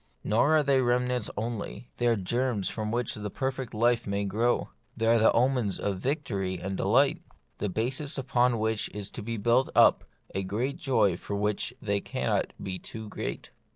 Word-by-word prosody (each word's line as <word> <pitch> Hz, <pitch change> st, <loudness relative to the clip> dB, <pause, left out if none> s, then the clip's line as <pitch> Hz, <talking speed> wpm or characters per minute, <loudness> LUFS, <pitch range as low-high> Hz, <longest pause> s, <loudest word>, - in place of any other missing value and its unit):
Nor 130 Hz, +9 st, +3 dB
are 150 Hz, -, +3 dB
they 135 Hz, -2 st, +3 dB
remnants 125 Hz, -1 st, +1 dB
only; 115 Hz, +1 st, -4 dB
they 120 Hz, -, +1 dB
are 115 Hz, -, +4 dB
germs 110 Hz, +1 st, -1 dB
from 110 Hz, -1 st, -3 dB
which 120 Hz, +1 st, -1 dB
the 105 Hz, -1 st, -5 dB
perfect 130 Hz, +1 st, -3 dB
life 120 Hz, +1 st, +2 dB
may 100 Hz, 0 st, -1 dB
grow; 115 Hz, +5 st, +1 dB, 0.3 s
they 115 Hz, -, 0 dB
are 115 Hz, 0 st, +5 dB
the 110 Hz, -, +5 dB
omens 125 Hz, -4 st, +2 dB
of 100 Hz, -2 st, -2 dB
victory 100 Hz, -, -2 dB
and 95 Hz, 0 st, -3 dB
delight; 125 Hz, +10 st, +3 dB, 0.4 s
the 105 Hz, -, -1 dB
basis 130 Hz, -, -1 dB
upon. 125 Hz, -2 st, +2 dB
which 110 Hz, 0 st, 0 dB
is 105 Hz, -2 st, -5 dB
to -, -, -6 dB
be 115 Hz, +2 st, -4 dB
built 120 Hz, +5 st, +3 dB
up -, -, +6 dB, 0.3 s
a 95 Hz, -, -1 dB, 0.3 s
joy 125 Hz, -, +2 dB
for 100 Hz, -, -5 dB
which 105 Hz, +4 st, -1 dB
they 100 Hz, -2 st, +1 dB
cannot -, -, -1 dB
be 95 Hz, -1 st, -4 dB
too 110 Hz, -1 st, -8 dB
great. -, -, -5 dB
115 Hz, 180 wpm, -28 LUFS, 105-125 Hz, 0.4 s, up